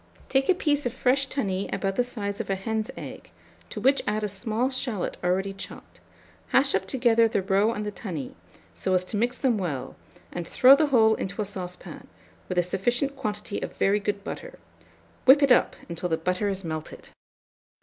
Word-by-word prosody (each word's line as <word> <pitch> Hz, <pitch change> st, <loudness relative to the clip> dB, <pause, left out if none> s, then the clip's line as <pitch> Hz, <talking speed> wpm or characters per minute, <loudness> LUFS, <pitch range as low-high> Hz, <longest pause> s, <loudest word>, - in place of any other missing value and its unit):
Take 270 Hz, 0 st, +2 dB
a 375 Hz, -, +6 dB
piece 290 Hz, -6 st, +1 dB
of 245 Hz, -, -6 dB
fresh 270 Hz, +1 st, +2 dB
tunny 200 Hz, -9 st, -2 dB
about 195 Hz, -1 st, -1 dB
the 245 Hz, -, +2 dB
size 205 Hz, -5 st, -3 dB
of -, -, -9 dB
a 195 Hz, -, +1 dB
hen's 220 Hz, +3 st, -2 dB
egg, -, -, -9 dB, 0.4 s
to -, -, -6 dB
which 275 Hz, +1 st, +3 dB
add 210 Hz, +1 st, 0 dB
a -, -, +1 dB
small 220 Hz, +5 st, -1 dB
shalot 245 Hz, -7 st, -2 dB
already 190 Hz, +2 st, 0 dB
chopped; 195 Hz, -, -9 dB, 0.5 s
hash 270 Hz, +1 st, +3 dB
up 190 Hz, 0 st, 0 dB
together 230 Hz, 0 st, +3 dB
the 200 Hz, -3 st, -1 dB
roe 200 Hz, +3 st, +3 dB
and 210 Hz, -2 st, -4 dB
the 210 Hz, -, -3 dB
tunny, 175 Hz, -, -6 dB, 0.4 s
so 185 Hz, -, 0 dB
as 185 Hz, -, +2 dB
to 185 Hz, -, -5 dB
mix 245 Hz, +3 st, 0 dB
them 245 Hz, -6 st, +1 dB
well, 155 Hz, -9 st, -4 dB, 0.4 s
and 175 Hz, -1 st, -5 dB
throw 260 Hz, +2 st, +7 dB
the 305 Hz, +1 st, +2 dB
whole 225 Hz, -5 st, +5 dB
into 195 Hz, -1 st, -4 dB
a 210 Hz, -, 0 dB
saucepan, 180 Hz, -2 st, -7 dB, 0.4 s
with 185 Hz, -, -3 dB
a 175 Hz, -, +4 dB
sufficient 240 Hz, +10 st, 0 dB
quantity 210 Hz, -5 st, -4 dB
of -, -, -6 dB
very 200 Hz, +2 st, +3 dB
good 205 Hz, -1 st, -3 dB
butter: -, -, -7 dB, 0.7 s
whip 280 Hz, +2 st, +7 dB
it 275 Hz, -, +4 dB
up 250 Hz, -, +4 dB
until 170 Hz, +1 st, -4 dB
the 160 Hz, -, +1 dB
butter 180 Hz, +5 st, -1 dB
is 195 Hz, -1 st, -3 dB
melted! 155 Hz, -2 st, -6 dB
210 Hz, 195 wpm, -26 LUFS, 190-250 Hz, 0.7 s, throw